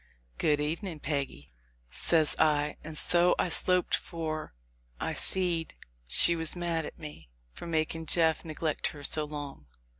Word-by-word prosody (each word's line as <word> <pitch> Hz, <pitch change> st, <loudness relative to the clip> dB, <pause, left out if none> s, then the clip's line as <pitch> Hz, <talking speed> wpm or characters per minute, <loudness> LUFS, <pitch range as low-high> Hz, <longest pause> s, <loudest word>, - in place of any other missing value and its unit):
"Good 150 Hz, -1 st, +2 dB
evening, 160 Hz, +3 st, -3 dB
Peggy," 140 Hz, -, -4 dB, 0.4 s
says 160 Hz, -3 st, +2 dB
I, 150 Hz, -1 st, +2 dB
and 155 Hz, 0 st, -7 dB
so 175 Hz, +2 st, +4 dB
I -, -, 0 dB
sloped, 180 Hz, +1 st, +2 dB
for 155 Hz, -, -3 dB, 0.4 s
I -, -, -2 dB
seed 175 Hz, -3 st, +2 dB, 0.3 s
she 170 Hz, -, +5 dB
was 160 Hz, 0 st, -1 dB
mad 170 Hz, -3 st, -2 dB
at -, -, -11 dB
me 150 Hz, -, -10 dB, 0.2 s
for -, -, -9 dB
making 160 Hz, 0 st, -2 dB
Jeff 160 Hz, -1 st, +2 dB
neg 160 Hz, 0 st, -9 dB
lect 155 Hz, -2 st, +1 dB
her 145 Hz, -, -10 dB
so 155 Hz, +2 st, +1 dB
long. 145 Hz, -, -8 dB
160 Hz, 150 wpm, -29 LUFS, 150-170 Hz, 0.4 s, she